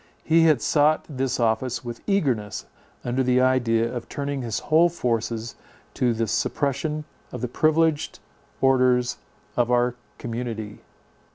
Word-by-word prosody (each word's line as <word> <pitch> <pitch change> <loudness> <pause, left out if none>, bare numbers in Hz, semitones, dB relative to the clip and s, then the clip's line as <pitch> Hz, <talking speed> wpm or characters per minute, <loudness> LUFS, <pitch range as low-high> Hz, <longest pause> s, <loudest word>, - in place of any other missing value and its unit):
He 165 +1 +4
had 155 -7 +3
sought 150 +1 +3
this 135 -4 -2
office 120 +2 0
with 120 -1 -6
eagerness, 130 - 0 0.4
under 125 +2 0
the 125 0 +3
idea 120 -3 +2
of 120 -2 -6
turning 140 -1 -3
his 115 -3 -3
whole 165 +3 +3
forces 115 -6 -2 0.4
to 120 -2 +1
the 115 0 0
suppression 150 +7 -1 0.3
of 125 - -6
the 125 - -1
privileged 155 +3 +1 0.4
orders 125 -2 +3 0.4
of 120 -1 +1
our 125 0 +2 0.2
community. 115 -3 -5
125 Hz, 130 wpm, -24 LUFS, 115-145 Hz, 0.4 s, He